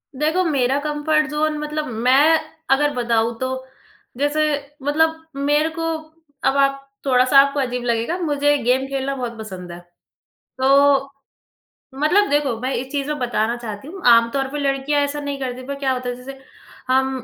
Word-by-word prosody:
देखो, 310 +6 +1
मेरा 275 -5 +1
comfort 300 +1 0
zone 305 0 0
मतलब 300 0 -3 0.2
मैं 295 +5 +5 0.3
अगर 290 +2 +3
बताऊँ, 235 -1 0
तो 260 0 -3 0.5
जैसे 300 +2 +1 0.3
मतलब 320 +3 +1
मेरे 295 +3 +1
को 330 0 -1 0.6
अब 275 - +2
आप 275 0 +2 0.2
थोड़ा-सा 255 +1 +5
आपको 280 +1 +3
अजीब 250 -2 -2
लगेगा, 235 +8 -1
मुझे 290 -4 +1
गेम 255 +3 +2
खेलना 275 0 -2
बहुत 240 -3 -5
पसंद 185 -5 -8
है। 170 - -8 0.8
तो 275 +1 +4 0.9
मतलब 380 +8 +3
देखो, 285 -5 +1
मैं 260 +1 -1
इस 260 +2 -4
चीज़ 280 -1 -2
में 300 0 -3
बताना 235 -2 0
चाहती 225 +1 -7
हूँ, 385 +4 -9
आमतौर 235 +3 +4
पे 295 - -4
लड़कियाँ 280 +1 0
ऐसा 285 +1 -3
नहीं 285 -1 -4
करती, 255 -1 -5
पर 280 - -3
क्या 270 -2 0
होता 250 -1 -4
है, 245 - -3
जैसे 265 +2 -10 0.5
हम 265 +1 +3
275 Hz, 165 wpm, -21 LUFS, 255-295 Hz, 0.9 s, मैं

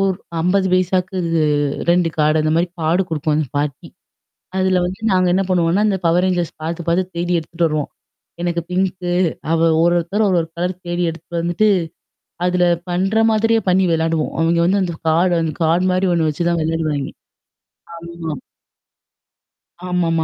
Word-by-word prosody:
ஒரு 195 -1 +2 0.3
50 190 +3 +2
பைசாக்கு 185 +1 +1 0.7
2 175 -1 +3
கார்டு 155 +1 +3
அந்த 155 - +1
மாரி 170 - +2
கார்டு 165 +4 +2
குடுக்கும் 155 -1 -1
அந்த 155 -1 0
பாட்டி. 145 -2 -3 0.7
அதுல 185 -1 +2
வந்து 185 +4 -4
நாங்க 185 -1 +3
என்ன 190 +2 +2
பண்ணுவோம்ன்னா, 175 +2 +2
இந்த 200 - +1
Power 170 +1 +3
Rangers 180 -3 0
பார்த்து 170 +2 -3
பார்த்து 170 +2 +3
தேடி 175 +1 -1
எடுத்துட்டு 165 +1 -1
வருவோம். 155 -2 -2 0.5
எனக்கு 175 -1 -1
பிங்க்கு. 180 -1 -1 0.4
அவ 165 - +2 0.2
ஒரு 175 +1 +3
ஒருத்தர் 195 +6 0
ஒரு, 190 - +2
ஒரு 165 - -6
கலர் 180 +2 -1
தேடி 175 0 -1
எடுத்துட்டு 170 +1 -6
வந்துட்டு, 175 +5 +1 0.8
அதுல 180 0 +2 0.2
பண்ற 195 +5 +1
மாதிரியே 225 +1 +2
பண்ணி 185 +1 +3
விளையாடுவோம். 160 -1 0
அவங்க 165 +1 +2
வந்து 195 +3 +2
அந்த 175 -2 -2
கார்டு 175 +3 +3
அந்த 155 -2 -2
கார்டு 170 +3 +2
மாரி 185 +1 +1
ஒண்ணு 160 -2 +1
வச்சு 170 +3 -1
தான் 170 -1 0
விளையாடுவாங்க. 155 -3 -2 0.8
ஆமா. 170 -2 -6 1.6
ஆமாமா. 165 -2 +1
175 Hz, 155 wpm, -19 LUFS, 165-185 Hz, 1.6 s, 2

